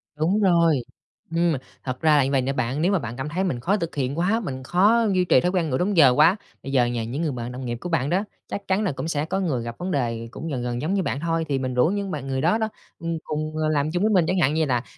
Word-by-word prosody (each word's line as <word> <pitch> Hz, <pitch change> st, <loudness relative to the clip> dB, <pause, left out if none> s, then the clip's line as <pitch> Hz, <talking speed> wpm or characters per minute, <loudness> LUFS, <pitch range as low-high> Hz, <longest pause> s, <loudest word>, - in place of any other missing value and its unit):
Đúng 165 Hz, +7 st, +1 dB
rồi. 170 Hz, -7 st, +4 dB, 0.5 s
Ừm, 170 Hz, -1 st, +3 dB, 0.3 s
thật 130 Hz, -1 st, -4 dB
ra 155 Hz, -2 st, +5 dB
là 140 Hz, -, +4 dB
như 135 Hz, -, -1 dB
vầy 135 Hz, -2 st, +3 dB
nè 135 Hz, +2 st, -1 dB
bạn, 130 Hz, +2 st, -1 dB
nếu 180 Hz, +4 st, +2 dB
mà 195 Hz, -, +2 dB
bạn 120 Hz, -3 st, -6 dB
cảm 135 Hz, +3 st, -4 dB
thấy 180 Hz, +5 st, -1 dB
mình 170 Hz, -11 st, -1 dB
khó 195 Hz, +11 st, +1 dB
thực 170 Hz, -5 st, -4 dB
hiện 140 Hz, 0 st, -2 dB
quá, 200 Hz, +6 st, +2 dB
mình 130 Hz, -, -5 dB
khó 205 Hz, -, +3 dB
duy 180 Hz, -1 st, +2 dB
trì 150 Hz, -, +5 dB
thói 180 Hz, -, +1 dB
quen 175 Hz, -4 st, 0 dB
ngủ 130 Hz, -, 0 dB
đúng 185 Hz, +3 st, 0 dB
giờ 140 Hz, -5 st, +8 dB
quá, 160 Hz, +8 st, +5 dB, 0.3 s
bây 135 Hz, -, -5 dB
giờ 125 Hz, -3 st, +4 dB
nhờ 120 Hz, -1 st, -2 dB
những 125 Hz, +7 st, -4 dB
người 160 Hz, -3 st, 0 dB
bạn 120 Hz, -1 st, -5 dB
đồng 125 Hz, +1 st, -6 dB
nghiệp 120 Hz, -1 st, -3 dB
của 180 Hz, -, -5 dB
bạn 150 Hz, -4 st, 0 dB
đó, 190 Hz, +4 st, +1 dB, 0.2 s
chắc 200 Hz, -, -6 dB
chắn 190 Hz, +3 st, +1 dB
là 200 Hz, -, 0 dB
cũng 145 Hz, +3 st, -5 dB
sẽ 150 Hz, -2 st, -1 dB
có 190 Hz, +4 st, -2 dB
người 150 Hz, -11 st, -1 dB
gặp 115 Hz, 0 st, -6 dB
vấn 185 Hz, +1 st, -4 dB
đề 115 Hz, -6 st, -1 dB
cũng 160 Hz, +6 st, -7 dB
gần 130 Hz, -4 st, -2 dB
gần 120 Hz, 0 st, -3 dB
giống 160 Hz, +6 st, -1 dB
như 195 Hz, -1 st, +1 dB
bạn 140 Hz, -, -2 dB
thôi, 165 Hz, +1 st, -1 dB
thì 135 Hz, -1 st, +1 dB
mình 130 Hz, -1 st, -2 dB
rủ 125 Hz, +5 st, +3 dB
những 200 Hz, 0 st, -2 dB
bạn 145 Hz, -3 st, -5 dB
người 130 Hz, -1 st, -1 dB
đó 175 Hz, +8 st, +3 dB
đó, 220 Hz, -1 st, -1 dB, 0.3 s
ừm, 165 Hz, 0 st, -3 dB
cùng, 155 Hz, 0 st, -3 dB
à, -, -, +1 dB
làm 150 Hz, 0 st, +1 dB
chung 175 Hz, +3 st, 0 dB
với 215 Hz, -, +3 dB
mình. 180 Hz, -4 st, +4 dB
Chẳng 185 Hz, +1 st, +1 dB
hạn 150 Hz, -4 st, +3 dB
như 160 Hz, 0 st, +2 dB
là 125 Hz, -4 st, 0 dB
155 Hz, 310 wpm, -24 LUFS, 130-180 Hz, 0.5 s, giờ